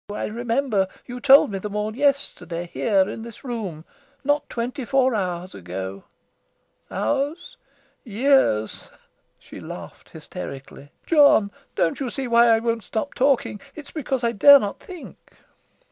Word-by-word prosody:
I 210 - -3
remember 230 -2 0 0.2
you 250 0 -7
told 275 -2 +6
me 195 - -3
them 210 +1 -6
all 210 +1 -2
yesterday, 260 -11 -1
here 195 -4 +2
in 225 - -6
this 230 -1 -11
room 205 - -5 0.4
not 290 +1 0
twenty 250 +4 -4
four 260 0 +2
hours 185 -3 -3
ago. 95 +2 -7 0.8
Hours? 290 - -2 0.5
Years!" 230 - +1 0.5
She - - -12
laughed - - -10
hysterically. 140 +1 -9
"John, 285 -10 +5 0.2
don't 165 - 0
you 265 -3 -2
see 265 +1 -4
why 235 0 +5
I 225 -1 +5
won't 230 -1 -2
stop 220 +9 -4
talking? 260 -6 +1
It's 300 -2 -10
because 265 -5 -3
I 235 - +2
dare 280 +7 +8
not 205 -5 -4
think." 360 -3 -12
230 Hz, 140 wpm, -23 LUFS, 195-275 Hz, 0.8 s, dare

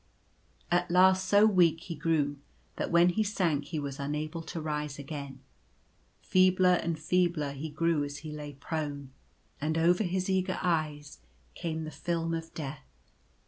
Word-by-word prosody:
At 175 0 +2
last 185 +1 +5
so 205 +2 +6
weak 175 -6 +4
he 170 - -6
grew 145 -2 0 0.4
that - - -2
when 170 +1 +5
he 200 +5 0
sank 175 -9 0
he 160 +2 -5
was 140 -2 -4
unable 150 +3 -3
to 165 +1 -6
rise 150 -2 -3
again. 140 -2 -7 0.8
Feebler 185 -1 +4
and 165 -1 -2
feebler 160 -2 +1
he 140 +3 -6
grew 160 0 +1
as 145 0 -5
he 155 - -5
lay 150 -1 -7
prone; 140 -1 -5 0.5
and 155 +2 0
over 175 +5 +3
his 185 0 -1
eager 185 -1 0
eyes 155 - -1 0.3
came 160 -1 -4
the 155 - -6
film 165 0 -2
of 165 0 -4
death. 140 -3 -6
160 Hz, 155 wpm, -30 LUFS, 145-180 Hz, 0.8 s, so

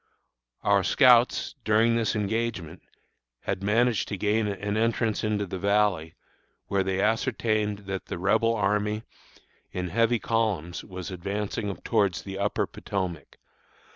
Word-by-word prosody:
Our 100 -1 +3
scouts, 125 -1 +4
during 110 +2 +3
this 115 -1 0
engagement, 105 -5 -2 0.6
had - - -3
managed 115 +3 +2
to 100 - -4
gain 105 +2 +1
an 100 +1 -3
entrance 115 0 0
into 105 -1 0
the 95 0 -6
Valley, 100 -5 +1 0.5
where 100 -1 0
they 95 0 -1
ascertained 105 -1 0
that 95 -1 -5
the - - -4
Rebel 110 +5 +2
army, 105 +1 0 0.7
in 90 -1 -3
heavy 115 +5 +2
columns, 105 -8 -1
was 95 -1 -7
advancing 100 +2 -3
towards 100 -8 +1
the 95 0 -6
Upper 100 +1 0
Potomac. 90 -7 -5
105 Hz, 130 wpm, -27 LUFS, 95-110 Hz, 0.7 s, scouts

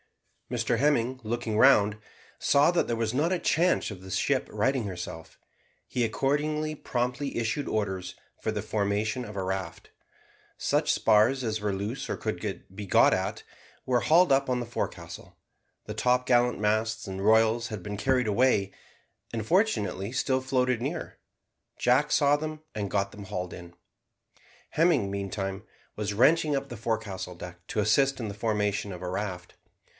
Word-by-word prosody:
Mr 120 -1 0
Hemming, 130 -2 +1
looking 115 -1 -2
round, 105 -5 +5 0.4
saw 145 +4 +4
that 175 - +1
there 120 - 0
was 115 0 -1
not 150 +7 +1
a 185 - +1
chance 175 +3 +2
of 95 -3 -9
the 95 - -11
ship 90 - 0
righting 130 -1 +1
herself. 85 -4 -7 0.5
He 125 - -1
accordingly 150 +6 0
promptly 125 +1 -2
issued 120 +5 -1
orders 95 -4 -2 0.3
for - - -1
the - - -3
formation 105 +3 -1
of 105 -3 -8
a 95 - -1
raft. 95 -3 -4 0.7
Such - - +1
spars 115 +5 +3
as 110 -2 -2
were 105 -1 0
loose 105 +8 -4
or - - -2
could - - -4
be 105 +1 -6
got - - +5
at, - - -2 0.4
were 125 -2 +2
hauled 170 +2 +5
up 135 0 +3
on 125 -1 +1
the 120 - -3
forecastle. 115 - -6 0.5
The - - -5
topgallant 125 -2 +2
masts 110 +1 0
and 95 0 -5
royals 110 +2 +4
had 105 -3 -6
been 105 -1 -5
carried 125 +3 +1
away, 105 -2 +2 0.6
and 110 -2 -3
fortunately 115 - +1
still 130 0 0
floated 130 -2 +1
near; 155 +6 -4 0.6
Jack - - +3
saw 145 0 +4
them 155 +1 -5
and 100 -2 -3
got 100 -1 0
them 105 -1 -9
hauled 90 -1 -4
in. 85 0 -11 1.0
Hemming, 155 - +3
meantime, 95 -1 -3 0.3
was 105 -1 -2
wrenching 150 +6 +4
up 135 0 -4
the 120 - -7
forecastle 110 -5 -3
deck 90 0 -10
to - - -2
assist 135 +6 +3
in 115 - -3
the - - -5
formation 105 -1 -1
of 90 -1 -8
a - - -3
raft. 90 -2 -4
110 Hz, 160 wpm, -28 LUFS, 100-130 Hz, 1.0 s, round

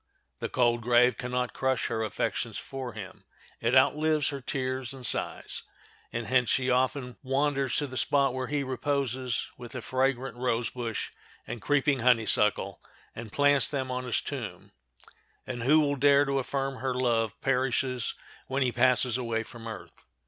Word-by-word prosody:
The - - -3
cold 120 -2 +2
grave 120 +1 +4
can 125 0 -4
not 125 0 -1
crush 130 -2 0
her 110 - -1
affections 110 +1 -2
for 130 -3 -6
him—it 110 +4 -5
outlives 150 +3 +3
her 140 -1 -5
tears 130 -1 -3
and 130 -2 -7
sighs; - - -1 0.5
and 115 0 -3
hence 125 -1 +2
she 130 -1 +2
often 125 0 0
wanders 135 0 0
to 145 - +1
the 130 -2 -6
spot 135 +2 +2
where 130 -1 -3
he 145 0 -1
reposes 130 -2 -1
with 120 +1 -9
the 130 - -4
fragrant 130 -1 0
rose 120 -2 0
bush 120 -3 -4 0.3
and 120 - -6
creeping 145 -1 +2
honeysuckle, 105 -5 +2 0.3
and 110 -2 -7
plants 145 0 +4
them 130 -3 -2
on 125 0 -3
his 125 - 0
tomb; - - -6 0.7
and 120 - -5
who 145 +6 +5
will 145 -2 +2
dare 140 +1 +5
to 140 0 0
affirm 135 0 -2
her 130 -1 -2
love 115 -3 0
perishes 130 -2 0 0.3
when 135 +1 +1
she 125 - +1
passes 125 -1 +3
away 115 -2 -1
from 115 0 -10
earth? 110 -3 -9
130 Hz, 165 wpm, -28 LUFS, 120-135 Hz, 0.7 s, who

